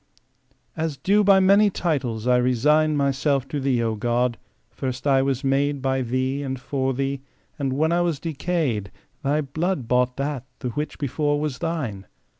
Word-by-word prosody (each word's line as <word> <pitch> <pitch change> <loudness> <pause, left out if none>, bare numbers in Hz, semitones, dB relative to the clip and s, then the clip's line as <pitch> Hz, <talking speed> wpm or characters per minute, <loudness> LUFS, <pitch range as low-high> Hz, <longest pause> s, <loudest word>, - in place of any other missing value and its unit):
AS 160 -3 -2
due 205 +6 +3
by 195 -1 +6
many 200 +2 +5
titles 135 - -2
I 125 0 +4
resign 150 +5 +3
Myself 140 -1 +1
to 145 - -2
thee, 130 -3 +1
O 115 -1 0
God. 120 +2 0 0.3
First 130 0 -5
I 135 -2 +4
was 135 0 -1
made 140 +1 +1
By 130 0 0
Thee; 130 +3 -1
and 130 -2 -4
for 135 0 -1
Thee, 135 0 -2 0.4
and 135 -2 -1
when 155 +5 +1
I 175 +1 +2
was 170 -5 0
decay'd 150 - -2 0.3
Thy 145 +2 +1
blood 155 -1 -2
bought 125 +1 +1
that, 140 -2 -3
the 125 - -4
which 150 +5 -4
before 145 +1 0
was 150 -4 -3
Thine. 135 - -3
135 Hz, 170 wpm, -23 LUFS, 125-155 Hz, 0.4 s, by